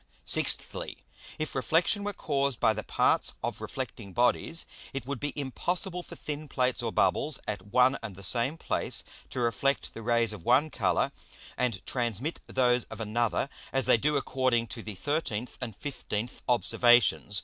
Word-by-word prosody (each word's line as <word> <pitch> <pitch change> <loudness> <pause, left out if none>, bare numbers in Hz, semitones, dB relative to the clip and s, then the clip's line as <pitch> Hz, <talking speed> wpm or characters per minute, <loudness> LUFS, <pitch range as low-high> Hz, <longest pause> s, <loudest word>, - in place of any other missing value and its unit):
Sixthly, - - +1 0.4
If 155 -1 -3
Reflexion 165 - +2
were 205 - -1
caused 140 - 0
by 110 - +4
the 110 - -3
parts - - +2
of - - -3
reflecting 100 -2 -6
Bodies, 125 - +1 0.3
it 135 -3 -4
would 140 -2 -3
be 145 +3 -2
impossible 180 - -1
for - - -10
thin 150 0 -5
Plates 125 -2 0
or 115 -2 -1
Bubbles, 150 +5 +2
at 100 -2 -4
one 125 +5 +4
and 110 -5 -6
the 100 - -10
same 120 - +1
place, - - -2 0.3
to - - -4
reflect 125 +4 0
the 115 - -7
Rays 115 -1 +2
of 95 -6 -9
one 135 - +4
Colour, - - +1 0.4
and 120 -6 -1
transmit 120 - -1
those 125 -2 +2
of - - -9
another, 115 +3 0 0.2
as 135 -1 +2
they - - +6
do 150 +5 +2
according 130 -4 +1
to 115 - -4
the 105 -2 -7
13th 125 - -2
and 115 -5 -5
15th 125 -5 -4
Observations. 120 -4 +4
125 Hz, 165 wpm, -29 LUFS, 115-140 Hz, 0.4 s, they